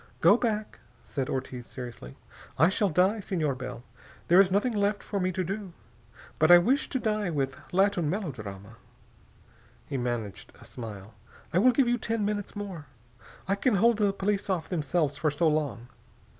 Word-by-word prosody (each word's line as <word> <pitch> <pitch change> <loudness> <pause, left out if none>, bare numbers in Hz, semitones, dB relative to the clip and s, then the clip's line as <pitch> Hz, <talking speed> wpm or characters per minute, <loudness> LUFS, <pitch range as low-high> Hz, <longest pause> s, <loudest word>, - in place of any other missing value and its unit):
"Go - - +6
back," 215 -3 -2 0.2
said 135 -3 -4
Ortiz 130 -2 -4
seriously. 120 - -9 0.4
"I 160 +5 +5
shall 200 +1 +1
die, 185 +6 +2
Senor 165 -8 -1
Bell. 130 -2 -7 0.5
There 180 +3 +8
is 195 - +3
nothing 205 +6 +1
else 205 +1 +2
for 200 - -3
me 185 0 0
to 185 +1 -2
do. 195 0 -5 0.7
But 155 - +4
I 175 - +11
wish 255 +12 +2
to 265 - -1
die 215 -4 0
with 140 -4 -1 0.2
Latin 190 -4 +2
melodrama." 110 - -5 1.1
He 140 - -4
managed 120 -5 -4
a - - -14
smile. 110 -3 -9 0.4
"I 175 - +4
will 250 +6 +6
give 260 0 +2
you 240 0 +1
ten 225 -2 -1
minutes 205 0 -3
more. 190 -8 -6 0.6
I 195 - +2
can 210 +3 +1
hold 225 +2 +3
off - - +5
the 195 - 0
police 200 0 -1
themselves 165 -4 -1
for 155 - +1
so 150 +3 +1
long. 150 -6 -1
180 Hz, 170 wpm, -28 LUFS, 135-205 Hz, 1.1 s, I